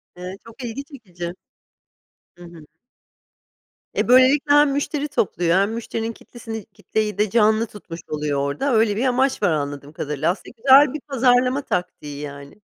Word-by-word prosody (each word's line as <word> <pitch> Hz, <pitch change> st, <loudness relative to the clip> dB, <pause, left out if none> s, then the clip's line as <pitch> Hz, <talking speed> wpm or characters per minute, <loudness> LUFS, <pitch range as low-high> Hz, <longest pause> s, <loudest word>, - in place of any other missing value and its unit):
Eee, 180 Hz, +2 st, -7 dB
çok 230 Hz, +3 st, -12 dB
ilgi 240 Hz, +4 st, -5 dB
çekici! 180 Hz, -, -8 dB, 1.0 s
Hı 175 Hz, -, -14 dB
hı. 170 Hz, -3 st, -13 dB, 1.3 s
E, -, -, 0 dB
böylelikle 265 Hz, +4 st, +5 dB
hem 290 Hz, -1 st, +5 dB
müşteri 285 Hz, +1 st, -2 dB
topluyor 175 Hz, -, 0 dB
hem 200 Hz, +3 st, +2 dB
müşterinin 230 Hz, 0 st, -4 dB
kitlesini 225 Hz, -2 st, -9 dB
kitleyi 210 Hz, -2 st, -3 dB
de 210 Hz, 0 st, +1 dB
canlı 220 Hz, +1 st, +3 dB
tutmuş 175 Hz, -5 st, -10 dB
oluyor 150 Hz, -2 st, -2 dB
orada. 140 Hz, -, -1 dB
Öyle 220 Hz, -2 st, +3 dB
bir 245 Hz, +5 st, 0 dB
amaç 255 Hz, -2 st, +1 dB
var 180 Hz, -, +3 dB
anladığım 145 Hz, -1 st, -4 dB
kadarıyla. 150 Hz, +3 st, -1 dB
Aslında 195 Hz, -, -9 dB
güzel 270 Hz, +3 st, +6 dB
bir 305 Hz, -, -4 dB
pazarlama 255 Hz, 0 st, +2 dB
taktiği 150 Hz, -, -4 dB
yani. 140 Hz, +6 st, -9 dB
220 Hz, 150 wpm, -22 LUFS, 170-255 Hz, 1.3 s, güzel